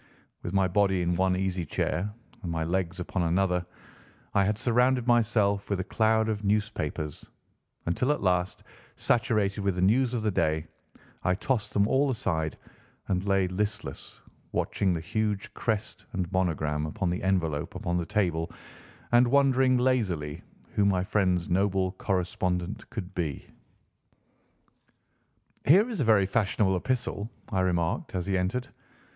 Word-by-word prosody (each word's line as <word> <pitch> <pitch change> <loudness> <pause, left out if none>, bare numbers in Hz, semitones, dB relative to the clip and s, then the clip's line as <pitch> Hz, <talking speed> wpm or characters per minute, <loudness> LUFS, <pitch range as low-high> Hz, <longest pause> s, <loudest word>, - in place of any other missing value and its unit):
With 85 - -4
my 95 -1 +3
body 95 -1 +2
in 85 0 +1
one 95 +1 +2
easy 95 -2 -1
chair 95 +5 -1 0.3
and 90 -4 -4
my 80 -1 -1
legs 90 +1 -1
upon 90 +1 -2
another, 90 +1 +1 0.7
I 100 - +4
had 105 +1 0
surrounded 125 +1 +2
myself 110 -4 +2
with 100 -2 0
a - - 0
cloud 110 +2 +2
of 105 -1 -2
newspapers 100 -8 -1 0.6
until 125 +11 +1
at 150 - -1
last, 90 -1 0 0.3
saturated 105 -4 +1
with 100 -2 0
the 90 - -1
news 125 +5 +3
of 115 - -2
the 105 - +1
day, 80 -3 +1 0.6
I 90 - +2
tossed 110 +1 -1
them 100 0 +4
all 135 +3 +3
aside 80 - -1 0.5
and 95 -1 +1
lay 95 -1 +3
listless, 105 -5 -4 0.3
watching 95 -2 0
the 85 - -2
huge 105 +3 -2
crest 110 -2 -3
and 90 -2 -2
monogram 80 -5 0
upon 90 +1 -2
the 90 - -2
envelope 85 -6 0
upon 85 +1 -1
the 85 - -2
table 85 -6 0 0.6
and 120 +1 +6
wondering 130 -1 +4
lazily 95 - 0 0.3
who 105 - +2
my 95 -2 +2
friend's 90 -4 +1
noble 95 0 +1
correspondent 90 0 -2
could 95 -3 -6
be. 80 -7 -3 2.2
"Here 190 - +7
is 230 -5 -4
a - - +3
very 100 -3 +5
fashionable 100 -1 +1
epistle," 115 0 -2 0.2
I 95 -4 0
remarked 90 - 0
as 90 -2 -1
he 95 0 0
entered. 95 +8 -1
95 Hz, 150 wpm, -28 LUFS, 90-110 Hz, 2.2 s, Here